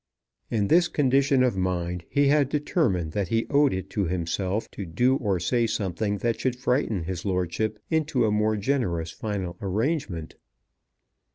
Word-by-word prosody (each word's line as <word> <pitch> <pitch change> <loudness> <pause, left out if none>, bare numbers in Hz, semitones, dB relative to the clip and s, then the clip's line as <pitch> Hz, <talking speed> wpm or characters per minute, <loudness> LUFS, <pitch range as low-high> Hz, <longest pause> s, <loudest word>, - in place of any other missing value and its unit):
In 105 -3 0
this 175 - +5
condition 135 -2 +3
of 125 -5 +2
mind, 90 -2 -2
he 140 -1 +3
had 145 -2 +3
determined 140 - 0
that 100 +2 -1
he 115 +4 0
owed 145 0 +4
it 95 0 -3
to 100 - 0
himself 90 +4 -2
to 100 - -6
do 120 +10 +2
or 100 -6 0
say 115 +6 +1
something 100 0 -1
that 115 +3 -1
should 130 -2 0
frighten 125 - 0
his 90 0 -4
lordship 95 +3 -1
into 155 -6 +1
a 105 - +1
more 105 +1 +1
generous 100 -9 -1
final 95 -4 -4
arrangement. 100 - -2
105 Hz, 160 wpm, -26 LUFS, 90-130 Hz, -, this